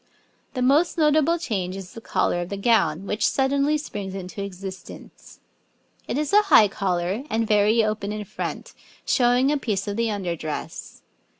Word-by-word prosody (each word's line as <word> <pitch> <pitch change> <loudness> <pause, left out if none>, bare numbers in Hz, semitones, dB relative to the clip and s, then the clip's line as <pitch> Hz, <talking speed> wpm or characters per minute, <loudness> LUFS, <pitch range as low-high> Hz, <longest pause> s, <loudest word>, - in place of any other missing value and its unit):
The 255 - 0
most 290 +8 +3
notable 310 +1 +3
change 195 - -3
is 190 -2 -9
the 230 - -9
collar 175 - 0
of 175 - -5
the 200 - -4
gown, 195 -6 +2
which 210 +3 0
suddenly 280 +2 +1
springs 200 -10 -6
into 190 +1 -6
existence. 190 -1 -10 0.7
It - - -2
is 300 +2 -2
a 420 - +7
high 225 - +6
collar 190 +3 -2
and 225 0 0
very 210 +2 +3
open 215 -1 -2
in 210 0 -5
front, - - -6 0.3
showing 250 +2 +3
a 295 - +1
piece 210 -7 -2
of 205 +1 -3
the 230 -1 +1
under 190 -5 -2
dress. 155 -2 -7
210 Hz, 170 wpm, -24 LUFS, 190-265 Hz, 0.7 s, a